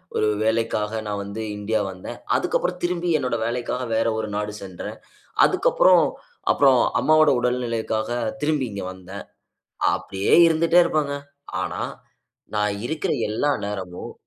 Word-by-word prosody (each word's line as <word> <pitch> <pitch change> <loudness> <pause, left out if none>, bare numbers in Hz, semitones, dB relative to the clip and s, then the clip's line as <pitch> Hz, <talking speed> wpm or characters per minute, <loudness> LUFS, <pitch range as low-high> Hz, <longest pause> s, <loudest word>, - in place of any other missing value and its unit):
ஒரு 110 - +2 0.2
வேலைக்காக 110 -1 0
நான் 100 -1 -2
வந்து 100 +3 -6 0.2
இன்டியா 105 +1 0
வந்தேன். 95 0 -8 0.2
அதுக்கு - - +1
அப்புறம் 180 0 -2
திரும்பி 175 0 0
என்னோட 125 -2 -1
வேலைக்காக 125 +2 -2
வேற 115 - +2
ஒரு 110 - -2
நாடு 105 0 -2
சென்றேன். 95 -3 -7 0.5
அதுக்கு - - +2
அப்புறம், 180 -3 +6 0.5
அப்புறம் 135 -3 +5 0.2
அம்மாவோட 155 -1 +5
உடல்நிலைக்காக 115 -3 -1 0.3
திரும்பி 150 -4 +1
இங்க 100 -2 -5
வந்தேன். 95 +2 -9 0.7
அப்டியே 95 +1 0
இருந்துட்டே 165 +2 +4
இருப்பேங்க. 150 -4 0 0.5
ஆனா, - - -4 0.8
நான் 105 -1 +1
இருக்கிற 160 +3 -1 0.2
எல்லா 130 +7 +1 0.2
நேரமும் 95 -4 -6
115 Hz, 130 wpm, -23 LUFS, 105-150 Hz, 0.8 s, அப்புறம்